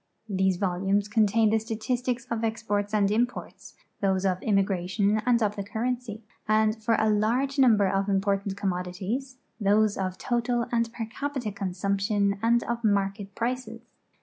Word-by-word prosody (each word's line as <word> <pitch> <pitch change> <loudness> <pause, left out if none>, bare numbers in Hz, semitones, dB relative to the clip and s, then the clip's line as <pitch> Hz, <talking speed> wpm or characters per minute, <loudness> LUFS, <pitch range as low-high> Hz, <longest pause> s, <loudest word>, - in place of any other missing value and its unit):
These 190 -2 +1
volumes 195 +2 0
contain 215 0 +3
the 220 - +3
statistics 240 +3 -2
of 230 -1 -1
e\'i)orts 210 -2 -1
and 205 -2 +2
im 235 +3 +3
jjorts, 190 -3 -11 0.3
those 190 -1 +1
of 185 0 0
immigration 195 +1 +1
and 240 -2 +4
of 210 -1 0
the 200 - -3
currency, 230 +1 -3 0.2
and, 215 0 +3
for 225 +1 +3
a 220 - +2
large 235 +7 +1
number 220 -7 +5
of 195 +1 0
important 195 0 0
commodities, 195 +8 -3 0.2
those 210 0 +3
of 185 -1 -2
total 240 +1 0
and 230 -1 0
per 230 -1 -4
capita 255 0 -4
consumption 200 +1 -1
and 235 +1 +3
of 235 0 -3
market 200 -1 0
prices. 235 -1 -3
210 Hz, 150 wpm, -27 LUFS, 195-230 Hz, 0.3 s, number